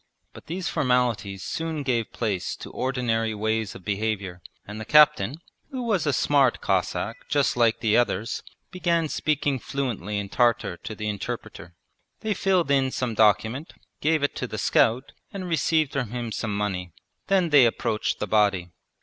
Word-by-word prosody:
But -, -, -13 dB
these 175 Hz, +2 st, -3 dB
formalities 120 Hz, -7 st, 0 dB
soon 160 Hz, -2 st, -3 dB
gave 120 Hz, -4 st, -1 dB
place 100 Hz, -6 st, -2 dB
to -, -, -10 dB
ordinary 115 Hz, -4 st, -1 dB
ways 110 Hz, 0 st, -1 dB
of 90 Hz, -, -12 dB
behaviour, 100 Hz, -3 st, -2 dB, 0.2 s
and 105 Hz, +2 st, -7 dB
the -, -, -3 dB
captain, 150 Hz, -4 st, +5 dB, 0.3 s
who 260 Hz, -3 st, -4 dB
was 205 Hz, -9 st, 0 dB
a -, -, +4 dB
smart 135 Hz, -1 st, +3 dB
Cossack -, -, -2 dB
just 145 Hz, -1 st, +2 dB
like 115 Hz, -2 st, +2 dB
the 110 Hz, -1 st, +2 dB
others, 115 Hz, -2 st, 0 dB, 0.3 s
began 170 Hz, -3 st, 0 dB
speaking 145 Hz, -3 st, 0 dB
fluently 115 Hz, -6 st, -3 dB
in 100 Hz, -1 st, -3 dB
Tartar 115 Hz, -4 st, +1 dB
to 110 Hz, -, -7 dB
the 105 Hz, 0 st, -4 dB
interpreter. 100 Hz, -4 st, -6 dB, 0.5 s
They 220 Hz, -1 st, 0 dB
filled 185 Hz, -6 st, +1 dB
in 135 Hz, -1 st, +3 dB
some 125 Hz, -2 st, -2 dB
document, 110 Hz, -, +2 dB, 0.3 s
gave 155 Hz, 0 st, +2 dB
it 145 Hz, -, 0 dB
to 125 Hz, -, -3 dB
the 110 Hz, -, -6 dB
scout, 115 Hz, +3 st, +2 dB, 0.2 s
and 190 Hz, -2 st, -5 dB
received 160 Hz, -2 st, +1 dB
from 135 Hz, -5 st, -1 dB
him 120 Hz, -1 st, -4 dB
some 105 Hz, -1 st, -2 dB
money. 90 Hz, -4 st, -3 dB, 0.3 s
Then 190 Hz, -3 st, +2 dB
they 140 Hz, -5 st, +7 dB
approached 110 Hz, -1 st, -1 dB
the -, -, -2 dB
body. 100 Hz, -4 st, +2 dB
120 Hz, 165 wpm, -25 LUFS, 105-145 Hz, 0.5 s, they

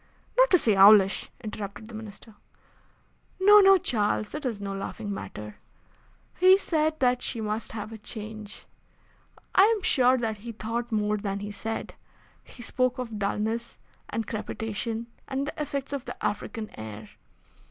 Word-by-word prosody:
"Not -, -, +5 dB
to 365 Hz, -, +6 dB
say 220 Hz, -, +2 dB
owlish," 195 Hz, 0 st, +6 dB
interrupted 210 Hz, 0 st, -6 dB
the 230 Hz, -, -12 dB
Minister. 220 Hz, 0 st, -10 dB, 1.1 s
"No, 415 Hz, +2 st, +8 dB
no, 390 Hz, -1 st, +7 dB
Charles; 215 Hz, -, 0 dB
it 300 Hz, -1 st, -5 dB
is 225 Hz, -5 st, -3 dB
no 200 Hz, -1 st, -4 dB
laughing 200 Hz, +1 st, -5 dB
matter. 105 Hz, -, -8 dB, 0.8 s
He 370 Hz, +1 st, +7 dB
said 315 Hz, -4 st, 0 dB
that 250 Hz, -1 st, +3 dB
she 230 Hz, -, -2 dB
must 215 Hz, +1 st, -3 dB
have 215 Hz, 0 st, -6 dB
a 220 Hz, -, -9 dB
change. 215 Hz, 0 st, -8 dB, 0.9 s
I -, -, +6 dB
am 435 Hz, -3 st, +1 dB
sure 260 Hz, -5 st, +4 dB
that 225 Hz, -3 st, -2 dB
he 230 Hz, +3 st, -8 dB
thought 230 Hz, +2 st, -4 dB
more 210 Hz, -1 st, +1 dB
than 200 Hz, -1 st, -3 dB
he 205 Hz, 0 st, -5 dB
said. 225 Hz, +2 st, -5 dB, 0.5 s
He 240 Hz, -, -12 dB
spoke 255 Hz, +1 st, 0 dB
of 230 Hz, -4 st, -5 dB
dulness 220 Hz, +3 st, -2 dB, 0.3 s
and 225 Hz, +1 st, -2 dB
crepitation, 225 Hz, +1 st, -4 dB, 0.2 s
and 270 Hz, +1 st, -2 dB
the 305 Hz, -, -5 dB
effects 280 Hz, -1 st, -3 dB
of 275 Hz, -3 st, -4 dB
the -, -, -6 dB
African 215 Hz, +1 st, -3 dB
air. 110 Hz, -1 st, -8 dB
225 Hz, 155 wpm, -27 LUFS, 210-255 Hz, 1.1 s, No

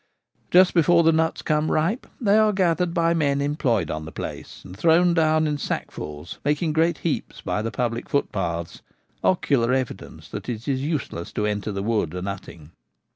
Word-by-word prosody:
Just 185 Hz, 0 st, +6 dB
before 170 Hz, 0 st, +4 dB
the 165 Hz, -, +5 dB
nuts 160 Hz, 0 st, 0 dB
become 155 Hz, 0 st, +1 dB
ripe 170 Hz, +10 st, 0 dB
they 210 Hz, -4 st, +3 dB
are 215 Hz, -1 st, +4 dB
gathered 180 Hz, -2 st, +1 dB
by 170 Hz, -1 st, +2 dB
men 140 Hz, -4 st, +1 dB
employed 135 Hz, -, 0 dB
on 80 Hz, 0 st, -4 dB
the 80 Hz, -, -8 dB
place, -, -, -7 dB
and 90 Hz, -1 st, -10 dB
thrown 170 Hz, -, +4 dB
down 155 Hz, -1 st, +3 dB
in 150 Hz, -1 st, -1 dB
sackfuls, 75 Hz, -, -5 dB
making 150 Hz, +2 st, 0 dB
great 165 Hz, 0 st, +2 dB
heaps -, -, -2 dB
by -, -, -2 dB
the 115 Hz, -, -2 dB
public 120 Hz, 0 st, -3 dB
footpaths 85 Hz, -11 st, -2 dB, 0.2 s
— -, -, -41 dB
ocular 130 Hz, -9 st, +2 dB
evidence 130 Hz, -2 st, -4 dB
that -, -, -6 dB
it 115 Hz, +1 st, -5 dB
is 135 Hz, -2 st, 0 dB
useless 140 Hz, -, -3 dB
to 105 Hz, -, -1 dB
enter 105 Hz, 0 st, -2 dB
the 100 Hz, -1 st, -3 dB
wood 105 Hz, -7 st, 0 dB
a 90 Hz, -, -4 dB
nutting. 90 Hz, -5 st, -7 dB
145 Hz, 180 wpm, -24 LUFS, 105-165 Hz, 0.2 s, Just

